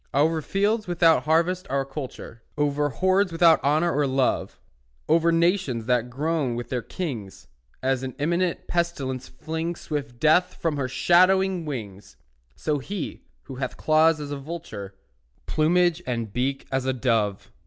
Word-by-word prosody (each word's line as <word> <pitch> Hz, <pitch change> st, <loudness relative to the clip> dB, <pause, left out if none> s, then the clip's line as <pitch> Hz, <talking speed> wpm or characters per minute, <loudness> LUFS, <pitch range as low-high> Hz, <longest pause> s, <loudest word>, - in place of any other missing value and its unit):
Over 160 Hz, +3 st, +3 dB
fields 205 Hz, +6 st, 0 dB
without 165 Hz, -6 st, +3 dB
harvest 170 Hz, +4 st, +1 dB
or 135 Hz, 0 st, 0 dB
culture, 135 Hz, -4 st, -8 dB, 0.2 s
Over 145 Hz, 0 st, +1 dB
hordes 185 Hz, -, +2 dB
without 165 Hz, -1 st, +5 dB
honour 155 Hz, +4 st, +2 dB
or 145 Hz, -1 st, +2 dB
love, 130 Hz, -1 st, 0 dB, 0.5 s
Over 165 Hz, +1 st, +4 dB
nations 165 Hz, -, +1 dB
that 125 Hz, 0 st, +1 dB
groan 145 Hz, -1 st, -1 dB
with 120 Hz, 0 st, -5 dB
their 125 Hz, -2 st, -1 dB
kings, 120 Hz, -, -6 dB, 0.4 s
As 130 Hz, -1 st, +1 dB
an 130 Hz, -1 st, -5 dB
imminent 170 Hz, +4 st, 0 dB
pestilence 140 Hz, -7 st, -2 dB
flings 160 Hz, +6 st, -4 dB
Swift 140 Hz, -5 st, -5 dB
death 160 Hz, +5 st, +3 dB
from 160 Hz, -3 st, -2 dB
her 135 Hz, -2 st, -1 dB
shadowing 185 Hz, +5 st, +3 dB
wings, 105 Hz, -9 st, -7 dB, 0.4 s
So 150 Hz, -2 st, -1 dB
he, 190 Hz, +5 st, -5 dB, 0.2 s
who 135 Hz, -2 st, -9 dB
hath 130 Hz, -, -4 dB
claws 155 Hz, 0 st, +3 dB
as 145 Hz, -1 st, -6 dB
a 145 Hz, -, -3 dB
vulture, 135 Hz, -, -7 dB, 0.5 s
Plumage 175 Hz, +2 st, +2 dB
and 115 Hz, -4 st, -3 dB
beak 135 Hz, +3 st, -1 dB
as 130 Hz, -1 st, 0 dB
a 130 Hz, -, +2 dB
dove. 115 Hz, -6 st, 0 dB
150 Hz, 150 wpm, -25 LUFS, 130-170 Hz, 0.5 s, without